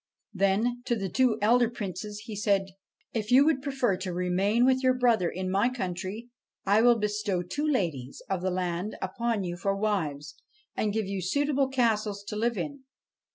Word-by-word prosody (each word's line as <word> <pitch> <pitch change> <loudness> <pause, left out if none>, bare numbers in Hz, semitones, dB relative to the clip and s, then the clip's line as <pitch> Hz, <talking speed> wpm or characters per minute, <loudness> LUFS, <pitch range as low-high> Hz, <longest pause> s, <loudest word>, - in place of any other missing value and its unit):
Then, 205 +5 +1
to 240 - +1
the 195 -4 -3
two 245 +3 +2
elder 240 +2 +4
Princes, 205 -1 -6
he 220 -3 -6
said: 200 -1 +1 0.3
' - - -46
If 215 -2 -2
you 265 +3 +7
would 305 -4 +2
prefer 265 -8 0
to 185 0 -4
remain 185 +6 +1
with 260 0 +3
your 255 -1 +3
brother 235 -8 +2
in 185 +1 -4
my 200 +5 +3
country 205 0 -5 0.3
I 205 +3 +4
will 240 0 +5
bestow 210 -3 -1
two 290 - -3
ladies 165 - -1
of 190 -2 -2
the 185 - 0
land 180 +2 -2
upon 215 +2 -1
you 175 -1 -4
for 195 +2 0
wives, 155 -9 -2 0.4
and 215 - 0
give 220 0 -1
you 195 0 -3
suitable 280 - +1
castles 215 -6 0
to - - -4
live 230 +1 0
in.' 285 -2 -4
210 Hz, 185 wpm, -28 LUFS, 185-240 Hz, 0.4 s, you